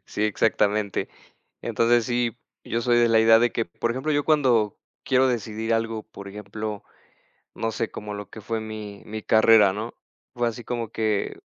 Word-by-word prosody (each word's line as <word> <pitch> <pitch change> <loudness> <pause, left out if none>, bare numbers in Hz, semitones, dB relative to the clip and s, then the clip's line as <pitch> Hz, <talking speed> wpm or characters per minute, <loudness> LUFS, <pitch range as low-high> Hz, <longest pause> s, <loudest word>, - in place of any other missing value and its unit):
Sí, 105 - -3
exactamente. 105 -1 +1 0.5
Entonces 120 0 +2
sí, 120 -2 0 0.3
yo 115 - -1
soy 120 0 +2
de 120 - +4
la 110 -1 +5
idea 115 0 +7
de 120 0 +2
que, 115 - 0
por 115 +7 -3
ejemplo, 130 +5 -3
yo 145 0 +1
cuando 125 -9 +2 0.3
quiero 130 0 +3
decidir 115 -1 -1
algo, 115 -1 -2
por 100 -2 -11
ejemplo, 105 +1 -6 0.7
no 115 0 -2
sé 110 +1 -2
como 105 0 -7
lo 105 0 -7
que 110 - -9
fue 115 +1 -2
mi 110 -2 -7
mi 110 0 -6
carrera, 110 -2 +6
¿no? 110 +4 -5 0.4
Fue 120 0 0
así 115 +1 -6
como 120 -2 -3
que 110 -2 -1
110 Hz, 175 wpm, -24 LUFS, 105-120 Hz, 0.7 s, idea